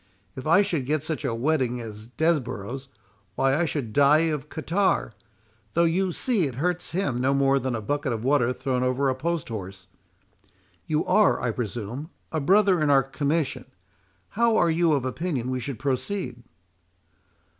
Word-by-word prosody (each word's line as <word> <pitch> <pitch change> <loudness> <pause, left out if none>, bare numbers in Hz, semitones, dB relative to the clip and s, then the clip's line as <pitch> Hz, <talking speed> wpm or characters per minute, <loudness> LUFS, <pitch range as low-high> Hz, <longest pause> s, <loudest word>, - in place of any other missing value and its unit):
If 130 - -6
I 170 +6 +6
should 150 -9 -2
get 155 0 0
such 155 -1 -3
a 125 -5 -1
wetting 125 -1 0
as 110 -2 -8
Desborough's, 130 -4 -2 0.5
why 135 0 +2
I 170 +3 +2
should 135 -9 -3
die 150 +3 +4
of 150 0 -5
catarrh, 170 - 0 0.6
though 170 - +4
you 180 +3 +1
see 205 - +1
it 130 - -7
hurts 175 +6 -1
him 145 -9 -1
no 135 +2 +2
more 135 0 +3
than 130 -1 -2
a 115 - -3
bucket 145 +3 -1
of 115 -1 -3
water 130 -2 +3
thrown 125 0 -2
over 130 +2 +1
a - - +2
post 165 +1 -2
horse. 95 -3 -7 1.0
You 155 0 0
are, 205 +2 +4
I 120 - -1
presume, 120 +5 -5 0.2
a 160 - -1
brother 190 +3 +4
in 150 - +2
our 135 -1 +5
commission,—how 160 - -2
are 170 - +3
you 165 -1 +3
of 135 -3 0
opinion 130 -2 -2
we 130 - -1
should 125 0 -5
proceed?" 130 - -3
140 Hz, 165 wpm, -25 LUFS, 125-165 Hz, 1.0 s, I